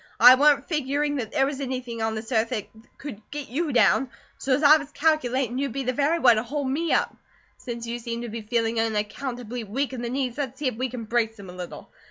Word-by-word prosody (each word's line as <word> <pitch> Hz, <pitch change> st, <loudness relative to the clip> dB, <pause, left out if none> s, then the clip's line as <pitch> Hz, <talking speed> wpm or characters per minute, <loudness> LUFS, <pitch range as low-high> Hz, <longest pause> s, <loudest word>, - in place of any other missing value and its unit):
I 250 Hz, +2 st, +10 dB
wa'n't 285 Hz, +1 st, +4 dB
figuring 290 Hz, -1 st, 0 dB
that 225 Hz, -5 st, -4 dB
there 270 Hz, -3 st, +2 dB
was 280 Hz, 0 st, -3 dB
anything 250 Hz, -3 st, -4 dB
on 220 Hz, 0 st, 0 dB
this 220 Hz, +3 st, -6 dB
earth 225 Hz, -1 st, +2 dB
that 220 Hz, -5 st, -3 dB, 0.3 s
could 265 Hz, -8 st, -8 dB
get 290 Hz, -1 st, -6 dB
you 300 Hz, +5 st, -1 dB
down; 260 Hz, +1 st, +4 dB, 0.3 s
so's 270 Hz, +2 st, +1 dB
I 300 Hz, +2 st, +8 dB
was 290 Hz, -2 st, -8 dB
calculatin' 265 Hz, -5 st, +1 dB
you'd 275 Hz, -4 st, -2 dB
be 275 Hz, -, -2 dB
the 255 Hz, 0 st, -1 dB
very 290 Hz, +5 st, +2 dB
one 245 Hz, -8 st, +5 dB
to 215 Hz, -, 0 dB
hold 280 Hz, +3 st, -3 dB
me 325 Hz, +4 st, -1 dB
up. -, -, +1 dB, 0.4 s
Since 235 Hz, -2 st, -6 dB
you 235 Hz, +1 st, -4 dB
seem 235 Hz, 0 st, -4 dB
to 240 Hz, -, -5 dB
be 225 Hz, +1 st, -5 dB
feeling 230 Hz, +1 st, 0 dB
unaccountably 230 Hz, +2 st, -3 dB
weak 260 Hz, +7 st, -2 dB
in 250 Hz, -, -5 dB
the 240 Hz, -, -3 dB
knees, 260 Hz, 0 st, -2 dB
let's 265 Hz, -2 st, -3 dB
see 290 Hz, -, -1 dB
if 255 Hz, -, 0 dB
we 255 Hz, +3 st, -2 dB
can 240 Hz, -1 st, -6 dB
brace 225 Hz, 0 st, 0 dB
them 200 Hz, -4 st, -10 dB
a -, -, -12 dB
little. 180 Hz, -1 st, -8 dB
250 Hz, 240 wpm, -25 LUFS, 230-280 Hz, 0.4 s, I